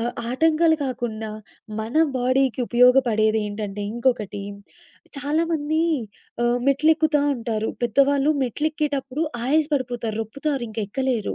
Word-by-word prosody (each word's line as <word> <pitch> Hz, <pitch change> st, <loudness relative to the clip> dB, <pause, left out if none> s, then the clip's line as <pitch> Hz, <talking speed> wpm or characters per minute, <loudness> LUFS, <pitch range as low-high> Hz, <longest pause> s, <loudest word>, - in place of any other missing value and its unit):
ఆహ్, 235 Hz, +1 st, -1 dB, 0.2 s
ఆటంకాలు 320 Hz, +4 st, +3 dB
కాకుండా 230 Hz, -4 st, -4 dB, 0.5 s
మన 220 Hz, +3 st, -6 dB, 0.2 s
బాడీకి 255 Hz, 0 st, +1 dB
ఉపయోగపడేదేంటంటే 220 Hz, -5 st, +2 dB
ఇంకొకటి 235 Hz, -5 st, -1 dB, 0.8 s
చాలామంది 310 Hz, +1 st, 0 dB, 0.6 s
ఆహ్, 240 Hz, +1 st, +2 dB
మెట్లెక్కుతా 305 Hz, +1 st, +3 dB
ఉంటారు. 225 Hz, -2 st, -2 dB, 0.2 s
పెద్దవాళ్ళు 275 Hz, +5 st, +3 dB
మెట్లు 290 Hz, +6 st, -1 dB
ఎక్కేటప్పుడు 285 Hz, -1 st, -2 dB, 0.2 s
ఆయాస 300 Hz, +4 st, +2 dB
పడిపోతారు, 240 Hz, -4 st, -3 dB
రొప్పుతారు, 275 Hz, +4 st, -3 dB
ఇంక 215 Hz, -, -8 dB
ఎక్కలేరు. 250 Hz, -1 st, -1 dB
255 Hz, 100 wpm, -23 LUFS, 225-290 Hz, 0.8 s, ఆటంకాలు